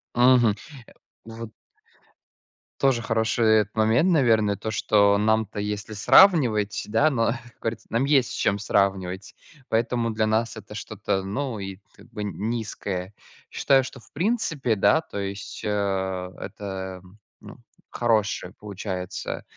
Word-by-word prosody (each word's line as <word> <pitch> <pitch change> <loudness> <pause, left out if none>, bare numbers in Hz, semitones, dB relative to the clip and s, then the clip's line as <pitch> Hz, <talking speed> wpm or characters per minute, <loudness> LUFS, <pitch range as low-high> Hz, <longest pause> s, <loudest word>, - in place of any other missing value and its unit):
Мгм, 120 -2 +5 0.8
э, 115 - -10
вот 115 -1 -7 1.3
Тоже 135 -4 +2
хороший 115 0 0
этот 105 0 -3
момент, 110 +10 +3
наверное, 115 - +3
то, 110 - -5
что 100 -1 +3
нам-то 110 0 +1
если 105 +1 -4
сравнивать, 110 - +4
да, 115 +9 +3
но 115 -5 +1
как 120 -1 -13
говорится 115 0 -4
нам 120 +4 +1
есть 140 -4 +3
с - - -5
чем 100 - +1
сравнивать, 95 -2 -1 0.3
поэтому 115 +1 0
для 110 0 0
нас 110 +1 0
это - - -10
что-то, 95 0 -3
ну, 120 +3 -3
и 95 -1 -7
как - - -17
бы 115 -3 -7
н 105 -1 -3 0.2
низкое. 100 -4 -4 0.4
Считаю, 135 -1 +3
что 130 0 -9
в - - -22
принципе, 160 - 0
да, 160 +10 +4
то 100 - -7
есть, 100 +1 -6
э, - - 0 0.7
это, 95 -2 -6
м, 95 +3 -19 0.2
ну, - - -12 0.3
хороший 110 -6 0
получается 95 -3 -5
110 Hz, 140 wpm, -25 LUFS, 100-120 Hz, 1.3 s, Мгм